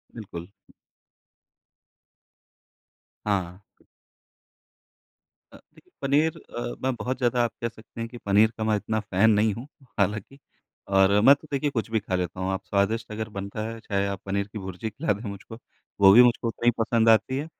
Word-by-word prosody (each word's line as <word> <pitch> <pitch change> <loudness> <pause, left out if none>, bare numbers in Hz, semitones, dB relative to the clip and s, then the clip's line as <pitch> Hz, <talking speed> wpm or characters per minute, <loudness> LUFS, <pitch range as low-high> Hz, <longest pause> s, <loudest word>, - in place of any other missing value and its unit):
बिल्कुल। 95 -5 -8 2.7
हाँ। 95 -2 -2 1.9
अ, - - -12 0.2
देखिए - - -22
पनीर 145 +3 +2
अ, - - -9 0.2
मैं 130 0 +1
बहुत 125 +2 -3
ज़्यादा 120 -1 +1
आप 120 - -1
कह 115 - -1
सकते 110 0 -15
हैं 115 - -3
कि 120 - -10
पनीर 105 +2 +4
का 110 - -2
मैं 110 -1 +2
इतना 110 +2 -2
फैन 105 +1 +2
नहीं 105 0 +3
हूँ 120 +6 -8 0.3
हालाँकि। 105 +7 -1 0.5
और 95 +1 +5
मैं 135 +6 +8
तो 155 - -17
देखिए 140 +1 0
कुछ 115 -5 -3
भी 110 - +2
खा 95 -3 -3
लेता 90 0 -3
हूँ। 95 +1 -1
आप 95 0 -3
स्वादिष्ट 110 +3 0
अगर 110 0 -4
बनता 100 +2 -4
है 115 0 -7
चाहे 100 -2 -1
आप 100 -1 -4
पनीर 100 0 -1
की 105 +1 -8
भुर्जी 95 +3 -5
खिला 110 +3 -1
दें 105 +2 -7
मुझको 100 +3 -9 0.4
वो 95 -1 +9
भी 120 +4 +9
मुझको 120 -1 +2
उतना 115 +1 -4
ही 120 - +6
पसंद 115 0 +3
आती 120 +4 +3
है। 145 - -3
110 Hz, 175 wpm, -25 LUFS, 100-120 Hz, 2.7 s, वो